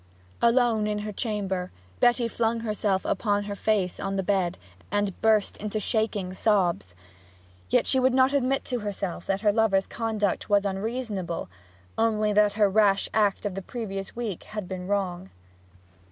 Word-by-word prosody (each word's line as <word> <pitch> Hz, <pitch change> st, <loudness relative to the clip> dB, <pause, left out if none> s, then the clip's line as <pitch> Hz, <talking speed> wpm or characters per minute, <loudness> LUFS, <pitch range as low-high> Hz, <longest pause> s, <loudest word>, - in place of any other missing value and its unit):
Alone 235 Hz, -3 st, +3 dB
in 210 Hz, 0 st, -1 dB
her 210 Hz, -, -3 dB
chamber, 195 Hz, -4 st, -3 dB, 0.3 s
Betty 240 Hz, -1 st, +3 dB
flung 230 Hz, 0 st, 0 dB
herself 210 Hz, -3 st, -1 dB
upon 205 Hz, 0 st, 0 dB
her 205 Hz, 0 st, -4 dB
face 200 Hz, -3 st, 0 dB
on 195 Hz, 0 st, -2 dB
the 195 Hz, -, 0 dB
bed, 185 Hz, -3 st, 0 dB, 0.3 s
and 205 Hz, -1 st, -1 dB
burst 220 Hz, -2 st, +2 dB
into 215 Hz, +1 st, -3 dB
shaking 210 Hz, -4 st, -1 dB
sobs. 175 Hz, -, +1 dB, 0.7 s
Yet -, -, +3 dB
she 265 Hz, -, +3 dB
would 260 Hz, 0 st, +4 dB
not 260 Hz, +2 st, +4 dB
admit 270 Hz, -1 st, +1 dB
to 250 Hz, -2 st, -2 dB
herself 195 Hz, -4 st, -4 dB
that 195 Hz, 0 st, 0 dB
her 210 Hz, -2 st, +3 dB
lover's 205 Hz, -3 st, +3 dB
conduct 220 Hz, -5 st, -2 dB
was 205 Hz, 0 st, +3 dB
unreasonable; 200 Hz, -, -3 dB, 0.5 s
only 215 Hz, -2 st, +2 dB
that 210 Hz, 0 st, +4 dB
her 210 Hz, -1 st, +4 dB
rash 200 Hz, 0 st, +3 dB
act 210 Hz, -1 st, +2 dB
of 205 Hz, -, -1 dB
the 195 Hz, -, -4 dB
previous 195 Hz, -2 st, -6 dB
week 225 Hz, -7 st, -4 dB
had 210 Hz, -3 st, -6 dB
been 185 Hz, -1 st, -5 dB
wrong. 190 Hz, -2 st, -2 dB
205 Hz, 160 wpm, -26 LUFS, 195-225 Hz, 0.7 s, would